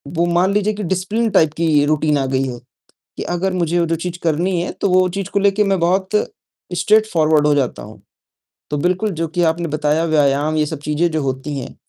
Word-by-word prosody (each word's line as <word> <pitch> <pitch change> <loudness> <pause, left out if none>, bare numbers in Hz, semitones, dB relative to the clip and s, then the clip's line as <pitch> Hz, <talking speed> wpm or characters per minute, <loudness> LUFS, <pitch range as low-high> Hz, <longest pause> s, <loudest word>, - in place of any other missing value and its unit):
वो 170 +1 +2
मान 175 +3 +2
लीजिए 210 +1 +1
कि 205 0 -5
डिसिप्लिन 195 +6 -1
टाइप 160 -3 +3
की 155 -3 +2
रूटीन 150 0 +1
आ 135 - 0
गई 130 0 0
है, 120 -1 -6 0.6
कि - - -3
अगर 185 +2 -2
मुझे 170 -1 0
जो 165 0 -1
चीज़ 175 +1 -5
करनी 170 +3 0
है, - - -3
तो 200 - -2
वो 185 0 +4
चीज़ 195 +1 -4
को 200 - +1
लेके 200 +1 +2
मैं 195 -2 +1
बहुत 190 +3 +1 0.6
स्ट्रेटफ़ॉरवर्ड 165 -8 +2
हो 150 - +4
जाता 135 -3 -1
हूँ। - - -13 0.7
तो 150 - -2
बिल्कुल 185 +6 0
जो 165 - 0
कि 175 +2 -1
आपने 165 +1 0
बताया 150 +2 0
व्यायाम 150 0 +1
ये 150 - +2
सब 150 -1 -5
चीज़ें 155 +3 +1
जो 155 -1 -1
होती 135 +2 -3
हैं 130 - -9
170 Hz, 210 wpm, -18 LUFS, 150-185 Hz, 0.7 s, वो